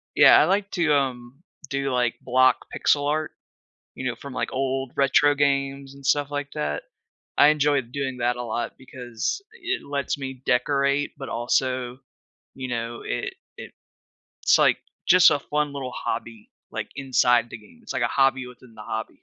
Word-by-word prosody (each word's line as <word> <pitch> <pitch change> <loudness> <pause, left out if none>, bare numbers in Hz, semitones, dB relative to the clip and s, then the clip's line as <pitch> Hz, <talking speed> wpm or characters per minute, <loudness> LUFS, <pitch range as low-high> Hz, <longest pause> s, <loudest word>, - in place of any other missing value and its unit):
Yeah, - - +8
I - - +5
like 195 +2 +1
to, 160 -5 +2
um, 130 0 -2 0.3
do, 140 -1 -1
like, 125 -2 +1
block 130 +1 +3
pixel 145 0 +2
art, 155 +1 -1 0.6
you 130 - -6
know, 120 - -2
from, 140 -2 -10
like, - - -3
old 135 -1 -2
retro 145 +1 +4
games 140 -1 0
and 140 -1 -14
stuff 145 +1 +2
like 145 -1 -4
that. 75 0 -3 0.5
I 145 - +7
enjoyed 145 -5 +2
doing 135 -2 -3
that 120 0 0
a 125 - -5
lot 120 0 -3
because 125 - -4
i - - -15
it 375 +1 -2
lets 140 0 -2
me 130 -2 -7
decorate, 140 +2 +1
but 135 - -7
also, 125 +1 -1 0.6
you 130 -1 -5
know, 115 -1 -4
it 390 -1 -3 0.2
it - - -9 0.7
it's - - +5
like - - +4 0.3
just 185 0 +7
a 145 - +2
fun 150 0 -2
little 135 -3 -5
hobby, 115 -1 -5 0.2
like, - - -4
inside 125 -3 +2
the 115 - -7
game, 175 - -19
it's 220 - -6
like 125 - -1
a - - +3
hobby 135 -1 +2
within 125 -2 -15
the - - -13
hobby, 110 +1 -6
135 Hz, 180 wpm, -24 LUFS, 125-145 Hz, 0.7 s, Yeah